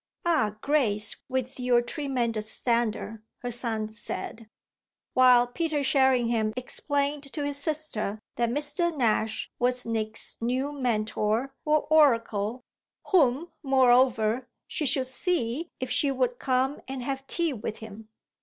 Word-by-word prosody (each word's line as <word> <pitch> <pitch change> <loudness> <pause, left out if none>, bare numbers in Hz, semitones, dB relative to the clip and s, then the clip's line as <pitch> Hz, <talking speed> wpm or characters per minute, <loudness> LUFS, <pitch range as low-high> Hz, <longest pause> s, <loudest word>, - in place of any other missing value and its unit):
"Ah 220 -12 +2
Grace, 220 -8 +3
with 260 0 -3
your 250 -1 +3
tremendous 240 -6 -2
standard!" 225 -2 -1 0.2
her 245 - -2
son 225 -2 0
said; 220 +1 -7 0.6
while 250 -1 +6
Peter 300 +3 -2
Sherringham 240 -5 +2
explained 280 +2 -2
to 295 -2 -2
his 285 -1 -2
sister 285 -9 -2 0.2
that 235 0 0
Mr. 295 +5 +1
Nash 220 -3 0
was 250 0 +1
Nick's 220 -1 -3
new 255 +4 -1
Mentor 230 -1 -1
or 305 0 +2
oracle 235 -6 +3 0.5
whom, 320 -2 +3
moreover, 250 -3 +3 0.2
she 300 - -1
should 260 0 +1
see 275 +2 -1
if 255 - -4
she 285 - +2
would 255 -2 -1
come 260 +2 0
and 260 -1 -5
have 270 +1 -4
tea 335 -1 +1
with 215 -2 -5
him. 220 0 -11
250 Hz, 125 wpm, -27 LUFS, 230-280 Hz, 0.6 s, while